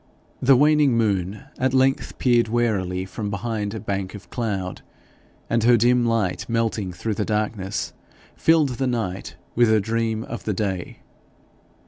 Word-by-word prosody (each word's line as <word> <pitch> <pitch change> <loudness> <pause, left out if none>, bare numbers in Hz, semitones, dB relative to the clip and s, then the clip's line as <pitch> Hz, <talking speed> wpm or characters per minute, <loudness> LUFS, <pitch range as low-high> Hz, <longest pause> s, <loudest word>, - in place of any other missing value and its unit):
The 135 +1 +6
waning 145 -2 +4
moon 100 0 0 0.2
at 130 0 +1
length 135 +1 +1
peered 120 -3 +3
warily 100 -6 0
from 105 +2 -5
behind 105 +1 -3
a - - -4
bank 100 -2 -3
of 105 - -12
cloud, 100 -6 -3 0.7
and 115 -1 +1
her 120 +1 +6
dim 120 +1 +3
light 110 -5 -1
melting 115 -4 0
through 110 +5 -3
the 105 - -1
darkness 105 -2 -2 0.4
filled 160 -3 +3
the 130 +1 -2
night 110 -6 -3 0.2
with 120 -1 +4
a 110 - +5
dream 115 +1 -1
of 120 - -7
the 105 - 0
day. 95 -3 -3
110 Hz, 150 wpm, -23 LUFS, 100-120 Hz, 0.7 s, The